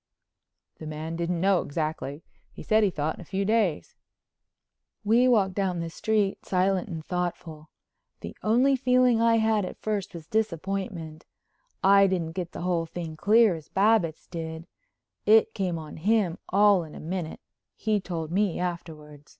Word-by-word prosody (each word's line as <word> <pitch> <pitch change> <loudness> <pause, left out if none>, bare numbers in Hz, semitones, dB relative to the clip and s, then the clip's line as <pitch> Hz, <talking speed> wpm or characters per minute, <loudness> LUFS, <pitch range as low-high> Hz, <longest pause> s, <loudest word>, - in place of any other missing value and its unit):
"The 155 - -7
man 155 +2 -5
didn't 170 +1 -2
know 190 0 +3
exactly. 155 -1 -4 0.3
He - - -11
said 220 0 +3
he 205 - +3
thought 155 -2 -2
in - - -12
a - - -8
few 195 +3 -2
days." 205 - 0 1.1
We 235 +4 +4
walked 205 -6 +3
down 185 -3 -1
the 165 0 -4
street 210 +1 0
silent 190 +1 0
and 160 -3 -6
thoughtful. 170 -3 -4 0.5
The - - -8
only 250 +5 +3
feeling 250 -2 +3
I 230 0 +4
had 220 -2 +2
at 185 - -6
first 200 -4 -3
was 165 -2 -8
disappointment. 185 -4 -3 0.6
I 195 0 +6
didn't 175 -4 -1
get 175 0 -5
the - - -7
whole 170 -2 -1
thing 160 -1 -6
clear 215 +5 +4
as 160 -3 -9
Babbitts 195 -5 +2
did. 160 -1 -6 0.6
It 220 +1 +5
came 185 -5 -2
on 155 -2 -9
him 195 -1 +1
all 200 -2 +4
in 155 - -11
a - - -8
minute, 170 0 -5 0.4
he 215 -1 0
told 165 -4 -5
me 195 -1 0
afterward. 155 -4 -6
180 Hz, 160 wpm, -26 LUFS, 165-210 Hz, 1.1 s, I